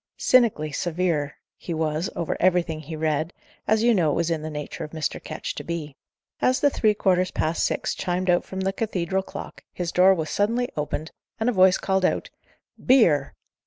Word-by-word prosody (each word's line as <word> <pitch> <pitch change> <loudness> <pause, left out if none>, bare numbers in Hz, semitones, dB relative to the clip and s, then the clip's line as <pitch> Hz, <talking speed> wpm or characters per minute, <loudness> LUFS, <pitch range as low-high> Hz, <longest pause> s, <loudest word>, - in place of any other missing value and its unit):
Cynically 220 -12 +3
severe 165 -2 -1 0.3
was 160 0 -1
he - - -8
over 170 - -2
everything 175 -3 +2
he 155 +1 -7
read, 155 +1 -1 0.3
as 220 +1 +3
you 240 0 +5
know 175 -7 +2
it - - 0
was 170 0 0
in 160 -2 -1
the 155 - -5
nature 150 +2 -6
of 150 - -8
Mr. 155 -2 -3
Ketch - - -5
to - - -7
be. 160 -4 -5 0.5
As 255 +1 +3
the 285 - +3
three 215 -4 +2
quarters 185 -2 +2
past 160 +2 -1
six - - -1
chimed 180 +1 -2
out 175 0 +3
from 190 0 -6
the 190 0 0
cathedral 190 -3 -1
clock, - - -9
his 175 -2 -4
door 190 +1 +5
was 160 -3 -3
suddenly 235 +4 0
opened, 150 +1 -3 0.3
and 220 +2 +1
a - - 0
voice 185 -1 +5
called 190 -1 0
out, - - 0 0.5
"Beer!" 170 - +4
175 Hz, 195 wpm, -24 LUFS, 155-195 Hz, 0.5 s, you